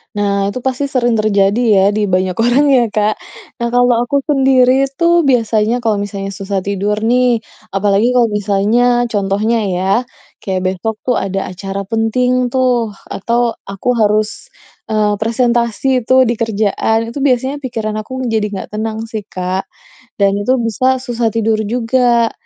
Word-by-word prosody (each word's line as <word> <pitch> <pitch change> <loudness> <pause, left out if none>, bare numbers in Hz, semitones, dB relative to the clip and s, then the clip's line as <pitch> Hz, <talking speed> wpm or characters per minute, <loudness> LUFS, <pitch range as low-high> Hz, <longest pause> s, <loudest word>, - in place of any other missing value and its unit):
Nah, 200 -1 0
itu 255 - -5
pasti 260 +1 -1
sering 240 -3 +1
terjadi 205 -2 +2 0.2
ya, 190 - +4
di 215 - 0
banyak 185 -1 0
orang 245 +5 +3
ya, 265 -3 +4
Kak. 210 0 +1 0.5
Nah, - - +1
kalau 245 0 +3
aku 280 +3 0
sendiri 265 -2 +3 0.2
tuh 340 0 +4
biasanya 230 -3 +1
kalau 225 -3 0
misalnya 195 -1 -5
susah 195 0 -3
tidur 200 +2 -2
nih, 240 +1 +2 0.3
apalagi 200 +4 +2
kalau 245 -2 +3
misalnya 215 +4 +1
contohnya 205 +1 0
ya, 180 +1 -1 0.6
kayak 190 -1 -2
besok 215 +4 -3
tuh 245 - +2
ada 195 0 -2
acara 195 +2 -5
penting 245 +3 0
tuh, 250 -4 +1 0.2
atau 235 +2 -1
aku 195 +3 -8
harus, 215 - 0 0.4
eee, 210 -1 +1
presentasi 235 +3 0
tuh 255 +2 +4
di 235 - 0
kerjaan, 220 0 0
itu 235 +5 -6
biasanya 265 0 +1
pikiran 225 -4 -3
aku 215 - -19 0.2
menjadi 220 -2 0
enggak 195 -2 -6
tenang 220 0 -3
sih, 220 -2 -5
Kak, 185 +1 -2 0.6
dan 200 -1 +4
itu 205 +6 +1
bisa 230 +2 -2
susah 240 -2 -2
tidur 225 -1 +1
juga. 235 +1 +1
225 Hz, 150 wpm, -15 LUFS, 205-245 Hz, 0.6 s, ya